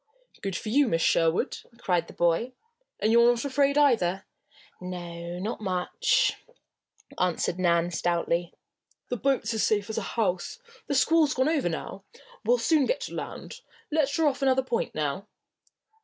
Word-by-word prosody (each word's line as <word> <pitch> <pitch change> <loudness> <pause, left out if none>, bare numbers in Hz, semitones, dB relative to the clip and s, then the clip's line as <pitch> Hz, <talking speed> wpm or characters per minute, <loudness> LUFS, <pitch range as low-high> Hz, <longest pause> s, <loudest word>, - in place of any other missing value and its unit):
"Good 195 -2 -3
for 215 - -4
you, 280 +4 +4
Miss 165 -6 +1
Sherwood!" 165 0 +2 0.2
cried 175 -6 0
the - - -12
boy. 175 +9 +1 0.5
"And 215 - +2
you're 235 +1 +6
not 240 +2 0
afraid, 280 +1 +2
either?" 195 -11 +2 0.6
"No 175 -1 -6
not 210 +5 -4
much," 185 - +1 0.8
answered 180 0 0
Nan, 170 -1 +2
stoutly. 170 0 -1 0.6
"The 245 - -2
boat's 265 0 0
as 220 - -1
safe 210 0 +1
as - - -2
a - - -6
house. 185 -5 -1 0.3
The 285 - -1
squall's 310 +2 +3
gone 260 +3 +2
over 295 - +1
now. 180 +3 -6 0.4
We'll 240 +3 +3
soon 285 +4 +2
get - - 0
to - - -6
land. - - -7 0.3
Let 290 -2 +1
her 325 - +2
off 275 -2 +1
another 265 -1 +3
point 245 -2 -2
now." 155 +7 -2
215 Hz, 155 wpm, -27 LUFS, 175-265 Hz, 0.8 s, you're